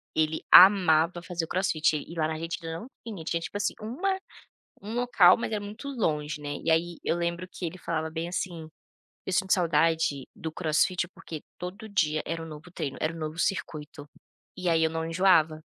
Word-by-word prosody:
ele 160 0 +1
amava 175 -3 +7
fazer 175 -2 -3
o - - -16
Crossfit 160 -4 +1
e 150 - -8
lá 155 -1 +1
na 160 - -2
Argentina 165 0 -5
não 235 - -9 0.2
tinha, 205 -8 -6
tinha, 170 +1 -1
tipo 200 - -5
assim, 205 - 0
uma 350 - -1 0.6
um 210 +3 -7
local, 235 -7 +5
mas 230 - -3
é 215 - 0
muito 210 +7 -8
longe, 155 - -1
né, 145 0 -4
e - - 0
aí 165 +1 +1
eu - - +1
lembro 170 +1 -2
que 180 - -5
ele 175 +3 -7
falava 160 -2 -3
bem 165 +1 -4
assim: 175 -3 -4 0.6
"Eu 190 - -3
sinto 190 +1 +1
saudade 160 -5 +2
do 160 -1 -6
Crossfit, 175 +2 +1
porque 160 -3 -9 0.2
todo 195 +5 -7
dia 155 -7 +1
era 165 0 -4
um 165 - -7
novo 155 +2 -10
treino, 140 -6 -4
era 155 +1 0
um 165 - -9
novo 155 +1 -5
circuito, 150 -5 -3 0.5
e 180 -1 -2
aí 165 -1 +3
eu 160 - +2
não 160 0 -3
enjoava." 165 -3 +3
165 Hz, 200 wpm, -27 LUFS, 160-185 Hz, 0.6 s, amava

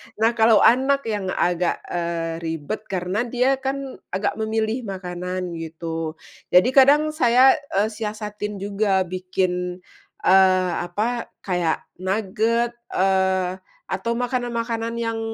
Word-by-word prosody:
nah 225 +2 +3
kalau 220 -1 +6
anak 270 +3 +4
yang 210 -4 -3
agak, 175 0 0
eee, 170 -1 -2
ribet 165 +5 -3
karena 190 +5 -1
dia 255 +3 +2
kan 270 0 -4 0.2
agak 200 +3 -1
memilih 220 +2 -1
makanan 180 -1 -4
gitu, 165 0 -5 0.4
jadi 180 +6 +6
kadang 290 +3 +5
saya, 260 -2 +5 0.2
eee, 210 +2 +2
siasatin 210 -1 -5
juga 200 -1 +1
bikin, 180 0 -2 0.4
eee, 185 -1 +5 0.2
apa 230 +6 -2 0.2
kayak 175 -4 0 0.2
nuget, 220 +5 0 0.2
eee, 190 -1 +1 0.3
atau 190 +5 -1
makanan-makanan 235 -2 -2
yang, 225 -1 -2
205 Hz, 115 wpm, -23 LUFS, 180-230 Hz, 0.4 s, kalau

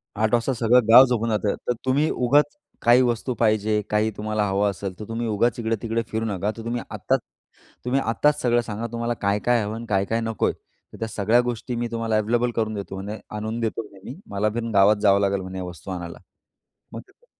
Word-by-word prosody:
8 110 +1 0
वाजता 120 +3 +2
सगळं 120 0 +3
गाव 120 +4 +9
झोपून 115 -2 0
जातं, 105 -2 0
तर 125 - +2
तुम्ही 140 +4 +2
उगाच 145 - +2 0.3
काही 120 +2 +6
वस्तू 120 +1 0
पाहिजे, 110 -1 +2
काही 105 +1 +1
तुम्हाला 105 0 -1
हवं 100 +1 +1
असेल, 95 0 -5
तर 105 - -6
तुम्ही 115 +1 -3
उगाच 115 +3 +1
इकडे-तिकडे 115 0 -1
फिरू 110 0 -2
नका. 100 -1 -1
तर 115 - -7
तुम्ही 120 +1 -2
आत्ताच - - 0 0.7
तुम्ही 130 +2 +1
आत्ताच 145 +6 +1
सगळं 120 -1 +2
सांगा, 115 0 -5
तुम्हाला 115 0 -2
काय-काय 105 +4 +2
हवं 105 +1 -4
आणि 115 +1 -7
काय-काय 100 +3 +1
नकोय, 115 -2 0
तर - - -20
त्या 115 - -2
सगळ्या 110 +2 +2
गोष्टी 120 +1 -4
मी 120 0 -2
तुम्हाला 115 -1 0
अव्हेलेबल 120 +3 +1
करून 110 -1 -1
देतो 100 -2 -6
म्हणे, 105 +2 -6 0.2
आणून 110 +2 -3
देतो 115 -1 -2
म्हणे 95 - -16
मी. 140 - -10
मला 105 +1 0
पण 115 -1 -2
गावात 100 +1 +6
जावं 100 -2 +5
लागेल 100 -1 +1
म्हणे 95 0 -6
वस्तू 90 +1 -8
आणायला. 85 -2 -6 0.7
मग - - -5
देतो. 485 - -28
110 Hz, 205 wpm, -24 LUFS, 105-120 Hz, 0.7 s, गाव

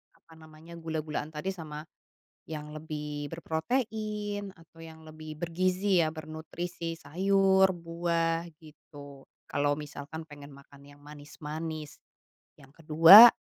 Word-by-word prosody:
apa 160 -1 -20
namanya, 160 +1 -13
gula-gulaan 155 -1 -4
tadi 150 +5 -3
sama, 155 -5 -7 0.7
yang 150 -1 -6
lebih 150 -1 -6
berprotein, 205 +3 -3
atau 165 0 -21
yang 160 0 -12
lebih 155 0 -9
bergizi 185 +1 +1
ya, 155 - -2
bernutrisi, 165 +2 -6
sayur, 190 +4 +3
buah, 165 -1 -1 0.2
gitu, 145 -3 -14 0.2
kalau 145 0 +1
misalkan 150 +1 -7
pengen 145 -1 -12
makan 140 0 -17
yang 145 0 -17
manis-manis. 150 +1 -7 0.6
Yang 140 +2 -18
kedua, 165 +9 +11
160 Hz, 110 wpm, -29 LUFS, 150-175 Hz, 0.7 s, kedua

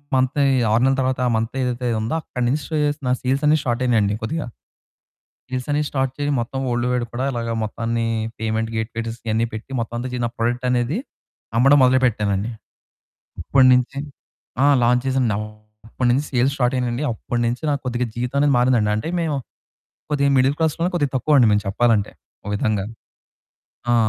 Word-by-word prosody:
మంతే 130 +2 +2 0.3
6 115 +2 +3
నెలల 135 0 +3
తర్వాత 130 0 0
ఆ - - +2
మంత్ 115 +3 -2
ఏదైతే 125 0 -2
ఉందో 115 +8 -2
అక్కడ 125 - -6
నుంచి 145 +5 0
సే 160 - -2
చేసిన 145 -3 -2
సేల్స్ 135 +3 0
అన్ని 155 +1 +5
స్టార్ట్ 120 0 -1
అయ్యినియండి 105 -4 +2
కొద్దిగ. 160 +8 -2 1.1
సేల్స్ 130 +1 -4
అన్ని 150 +1 +1
స్టార్ట్ 135 -2 -1
చేసి 145 0 0
మొత్తం, 135 +3 -4
వల్డ్ 120 +1 0
వైడ్ 120 -1 0
కూడా 130 +3 -1
ఇలాగా 115 -1 -2
మొత్తాన్ని 115 +1 -2 0.3
పేమెంట్ 110 0 -1
గేట్స్ 115 +1 -4
ఇవన్ని 110 +2 +1
పెట్టి 110 +5 -8
మొత్తం 115 +1 -5
అంతా 125 +1 -4
చి 125 - -3
నా - - -4
ప్రొడక్ట్ 120 +2 -1
అనేది 125 - 0 0.6
అమ్మడం 135 +3 +6
మొదలుపెట్టానండి. 115 -5 +1 0.9
అప్పటినుంచి 130 +1 +4 0.7
ఆ! - - +6 0.2
లాంచ్ 125 +1 +3
చేసానండి. 130 -5 +1 0.5
అప్పటినుంచి 125 +4 +1
సేల్స్ 130 +2 +2
స్టార్ట్ 125 0 +1
అయ్యినియండి. 125 +2 -1
అప్పటినుంచి 120 +3 -2
నాకు 140 -1 0
కొద్దిగా 125 0 -1
జీవితం 125 +3 -3
అనేది 145 -1 +3
మారిందండి. 120 -4 +3
అంటే 110 - -3
మేము, 155 -4 -1 0.7
కొద్దిగా 140 -1 +2
మిడిల్ 130 +2 +3
క్లాస్‌లో 165 +2 +1
కొద్దిగా 145 -5 0
తక్కువ 145 +4 +2
అండి 120 - +6
మేము 105 0 +3
చెప్పాలంటే. 110 0 +2 0.3
ఓ - - -7
విధంగా. 105 -1 0 1.1
ఆ! - - +4
125 Hz, 165 wpm, -21 LUFS, 115-135 Hz, 1.1 s, అమ్మడం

